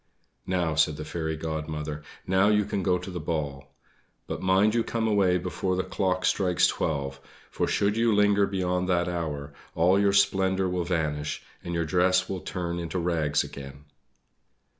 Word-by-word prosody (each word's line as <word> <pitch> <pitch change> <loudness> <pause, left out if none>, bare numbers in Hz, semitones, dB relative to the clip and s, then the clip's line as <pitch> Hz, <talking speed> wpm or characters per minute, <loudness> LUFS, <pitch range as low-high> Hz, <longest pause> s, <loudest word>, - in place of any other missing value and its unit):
"Now," 90 -3 0
said 75 -1 +2
the 75 - -6
Fairy 80 0 -3
Godmother, 75 -1 -4 0.2
"now 95 +2 +3
you 105 -1 +3
can 100 -1 -2
go 90 0 +2
to 90 +2 -7
the 90 - -4
ball. 70 -4 -4 0.5
But - - -5
mind 95 +3 +3
you 115 -1 +2
come 115 -1 -1
away 100 -4 +3
before 90 +1 -2
the 95 - 0
clock 95 -1 -1
strikes 90 -3 +3
twelve, 70 -3 -1 0.3
for - - -1
should 100 +1 +1
you 115 0 +3
linger 105 -1 +4
beyond 90 -1 -1
that 90 -1 +2
hour, 75 -5 -4 0.2
all 90 +4 +4
your 100 -1 +3
splendor 95 -1 +2
will 90 -1 -1
vanish, 75 -4 -2 0.2
and 85 0 -4
your 85 -1 0
dress 90 +3 +2
will 95 -2 -4
turn 85 -1 -3
into 85 +2 -4
rags 80 -4 +1
again." 70 +1 -10
90 Hz, 170 wpm, -27 LUFS, 80-95 Hz, 0.5 s, linger